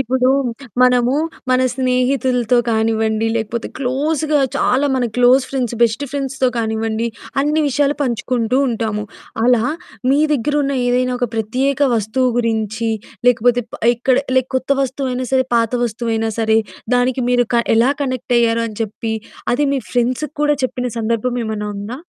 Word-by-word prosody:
ఇప్పుడు 255 0 +1 0.5
మనము 250 +1 +3 0.4
మన 255 0 +4
స్నేహితులతో 255 -1 +1
కానివ్వండి, 220 0 +1
లేకపోతే 225 +1 -3
క్లోజ్‌గా 295 +3 0 0.2
చాలా 270 +3 +2
మన 255 -1 +1
క్లోజ్ 250 +2 +5
ఫ్రెండ్స్, 250 -3 -2
బెస్ట్ 230 +4 +2
ఫ్రెండ్స్‌తో 270 -2 -1
కానివ్వండి, 220 0 -1 0.3
అన్ని 300 +2 +1
విషయాలు 285 +1 +1
పంచుకుంటూ 245 -1 -1
ఉంటాము. 220 -3 -2 0.4
అలా 245 -2 +4 0.5
మీ 280 - +3
దగ్గరున్న 290 +1 0
ఏదైనా 250 +1 +1
ఒక 245 -2 0
ప్రత్యేక 255 +6 -1
వస్తువు 225 +4 +1
గురించి, 225 -1 -1 0.4
లేకపోతే 245 0 +3
ప - - -10
ఇక్కడ 250 +2 +1 0.2
లైక్ 260 0 +2
కొత్త 260 +1 -4
వస్తువైనా 255 -1 -2
సరే, 260 -1 +3
పాత 230 0 +1
వస్తువైనా 225 -1 -2
సరే, 220 -1 +3 0.4
దానికి 250 +1 +1
మీరు 245 -1 +3
క 235 - +4
ఎలా 245 +5 +4
కనెక్ట్ 255 -2 -2
అయ్యారు 230 -1 +2
అని 215 - -10
చెప్పి 220 +1 -4 0.4
అది 290 +4 +1
మీ 270 - -1
ఫ్రెండ్సుకి 255 +5 -1
కూడా 295 -1 +3
చెప్పిన 250 -1 -2
సందర్భం 230 +2 -1
ఏమైనా 215 -1 -3
ఉందా? 205 +4 -5
245 Hz, 140 wpm, -18 LUFS, 225-260 Hz, 0.5 s, క్లోజ్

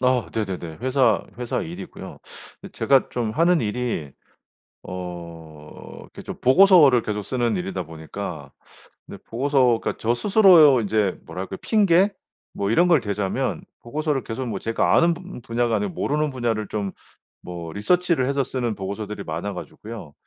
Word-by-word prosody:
아. 125 -2 +1
네네네. 95 -7 -4
회사 130 -7 +2
회사 125 +5 -2
일이고요. 170 - -9 0.5
제가 135 -2 +2
좀 120 -3 -2
하는 170 +7 +3
일이 105 - -3 0.7
어 85 -4 -9
이렇게 - - -12
좀 - - -7
보고서를 145 - +6
계속 105 -1 -3
쓰는 120 -1 -1
일이다 95 0 -3
보니까 80 -2 -7 0.6
근데 - - -10
보고서가 125 -1 +1
저 115 +1 +1
스스로 175 - +6
인제 105 -3 0
뭐랄까 95 +1 -6
핑계? 200 -2 +3 0.4
뭐 100 +1 -2
이런 175 +10 +4
걸 165 -6 +5
대자면 100 -2 -2 0.2
보고서를 150 +2 -2
계속 120 +3 -5
뭐 115 - -3
제가 115 0 +1
아는 170 0 +4
분 180 -5 -10
분야가 115 0 0
아니고 200 -3 -3
모르는 150 -1 -1
분야를 115 -5 -2
좀 100 -2 -3 0.5
뭐 85 -2 -7
리서치를 170 - +1
해서 140 0 +1
쓰는 120 -3 -3
보고서들이 100 +1 -5
많아 90 +6 -4
가지고요. 105 -10 -9
120 Hz, 315 characters per minute, -23 LUFS, 100-145 Hz, 0.7 s, 보고서를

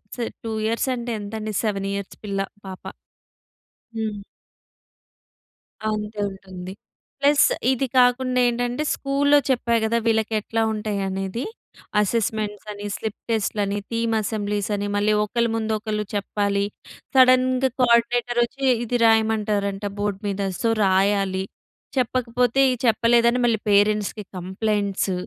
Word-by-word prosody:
స్ - - -12 0.2
2 225 - -4
ఇయర్స్ 230 +4 0
అంటే 240 0 -4
ఎంతండి 215 +1 -5
7 195 -3 -1
ఇయర్స్ 200 -1 -5
పిల్ల, 200 -2 -3 0.3
పాప. 190 -1 -8 1.1
హ్మ్. 215 -2 -3 1.7
అంతే 210 0 -4
ఉంటుంది. 185 -1 -9 0.5
ప్లస్ 285 0 +5 0.2
ఇది 265 +1 0
కాకుండా 250 0 +3
ఏంటంటే 245 +3 -1
స్కూల్లో 285 +1 +2
చెప్పా 240 -2 +1
గదా! 225 +1 +1
వీళ్ళకి 220 -1 +1
ఎట్లా 225 +2 -2
ఉంటాయి 210 -2 -2
అనేదీ. 195 +5 -3 0.6
అసెస్‌మెంట్స్ 210 -1 -1
అని, 205 0 -7
స్లిప్ 220 -2 -5
టెస్ట్‌లు 215 -1 0
అని, 200 +1 -2
థీమ్ 230 0 0
అసెంబ్లీస్ 205 -1 -2
అని 205 0 -2
మళ్ళీ 205 +1 +2
ఒకళ్ళ 235 +3 0
ముందు 220 -1 -1
ఒకళ్ళు 210 -1 -3
చెప్పాలి. 200 0 0 0.5
సడన్‌గా 255 0 +5
కోఆర్డినేటర్ 240 0 +3
వచ్చి 270 +3 -5 0.2
ఇది 245 +2 0
రాయమంటారంట 215 -3 +1
బోర్డ్ 205 -1 -1
మీద. 200 0 -2 0.2
సో 230 - +2
రాయాలి. 190 0 +2 0.5
చెప్పకపోతే 250 +1 +1 0.2
చెప్పలేదని 235 +1 +3
మళ్ళీ 230 -3 +2
పేరెంట్స్‌కి 210 +1 +2
కంప్లయింట్స్. 195 +1 -1
220 Hz, 120 wpm, -23 LUFS, 205-235 Hz, 1.7 s, ప్లస్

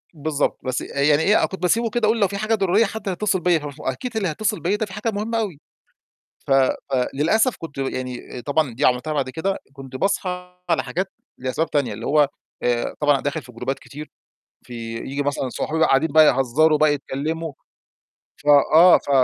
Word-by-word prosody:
بالضبط، 150 -1 -1
بس 130 -1 -1
يعني 145 +2 +2
إيه، 210 - +4
كنت 190 - -7
باسيبه 225 +6 +2
كده 220 0 0
أقول 225 +1 +2
لو 200 - +5
في 200 - -5
حاجة 215 +2 +1
ضرورية 200 +2 +3
حد 205 -1 -5
هيتصل 190 +1 0
بيّا، 175 -1 +3
ف 150 - -9 0.2
فأكيد 225 - -4
اللي 200 -4 0
هيتصل 210 +6 -1
بيّا 185 +4 0
ده 220 - -1
في 190 - -12
حاجة 215 +2 -2
مهمة 220 +3 -2
أوي. 195 -10 -3 0.9
ف - - -3
ف 135 -1 +5 0.4
للأسف 215 - +2
كنت 165 -4 -9
يعني 130 -2 -4
طبعًا 140 0 0
دي - - +1
عملتها 125 +5 +1
بعد 140 -3 -1
كده، 190 +8 -2 0.2
كنت 135 -1 -11
باصحى 180 +1 -2
على 165 - +2
حاجات 185 +3 -3 0.3
لأسباب 130 +6 -2
تانية، 145 -3 0
اللي - - -7
هو 145 -1 +3 0.3
آآ 120 -1 0
طبعًا 145 -2 +3
داخل 145 +2 -2
في 125 -1 -14
جروبات 125 +3 -4
كتير، 150 +2 -10 0.6
في 125 - -9 0.2
ييجي 140 +4 -3
مثلًا 140 -2 -2
صحابي 155 +5 -3
بقى 160 - +4
قاعدين 140 +3 +2
بقى 155 0 +7
يهزروا 145 +4 +3
بقى، 155 -1 +4
يتكلموا، 155 +3 -4 0.8
ف - - -20 0.3
آه 175 +3 +8
ف - - -8
155 Hz, 195 wpm, -22 LUFS, 135-195 Hz, 0.9 s, آه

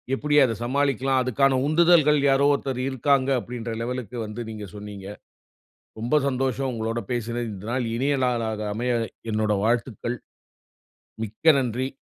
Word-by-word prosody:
எப்டி 145 +2 0
அத 115 - -1
சமாளிக்லாம். 135 0 +1
அதுக்கான 130 +1 +2
உந்துதல்கள் 155 -2 +5
யாரோ 135 +1 +4
ஒருத்தர் 135 -2 -2
இருக்காங்க 135 +1 +2
அப்டின்ற 115 0 -6
லெவலுக்கு 125 -2 -4
வந்து 105 +3 -6
நீங்க 105 -2 -7
சொன்னீங்க. 100 -2 -8 0.9
ரொம்ப 120 +6 +1
சந்தோஷம் 135 0 -1
உங்களோட 115 +1 -2
பேசுனது. 120 0 -2
இந்த 100 +1 -9
நாள் 125 -2 -1
இனிய 140 +3 +1
நாளாக 115 -3 -1
அமைய 120 +2 0 0.4
என்னுட 105 0 +1
வாழ்த்துக்கள். 120 +1 -1 1.1
மிக்க 115 +10 +3
நன்றி, 125 +1 -1
125 Hz, 130 wpm, -24 LUFS, 115-135 Hz, 1.1 s, உந்துதல்கள்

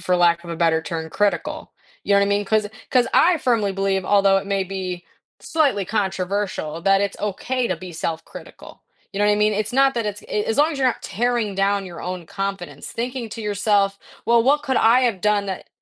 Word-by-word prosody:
for 180 0 +1
lack 170 0 +3
of 170 - -8
a 170 - -4
better 160 -1 +2
term, 160 -1 -4
critical, 205 0 -1 0.3
you 200 - +1
know - - +6
what 200 - +3
I - - -1
mean, 205 0 +1
'cause 215 0 +1 0.2
'cause 250 -1 +3
I 345 0 +5
firmly 225 -7 +1
believe, 195 -1 0
although 200 -1 +4
it 195 - -7
may 195 -1 0
be 185 -2 -5 0.4
slightly 280 -11 +1
controversial, 190 -5 -2
that 195 +1 +4
it's 200 0 -2
okay 240 +5 -2
to 185 - -1
be 180 +1 -9
self-critical, 160 0 -7 0.3
you 195 - -5
know 205 - +3
what 210 - +4
I - - +3
mean? 210 +1 +2
It's 215 +2 -2
not 270 0 +4
that 230 -2 -1
it's 205 0 -4
i - - -16
i 210 - +2
as 225 - -2
long 310 +2 +4
as 280 - -5
you're 260 - +2
not 245 - -1
tearing 235 -3 -1
down 195 0 +1
your 175 -2 -9
own 180 -2 -5
confidence, 195 -7 -5
thinking 245 0 -4
to 225 - -7
yourself, 205 -1 +1 0.3
"Well, 235 0 +5
what 285 +4 +3
could 265 - -1
I 230 +3 +5
have 230 -7 0
done 210 0 +1
that" 190 -2 -6
200 Hz, 230 wpm, -22 LUFS, 190-225 Hz, 0.4 s, know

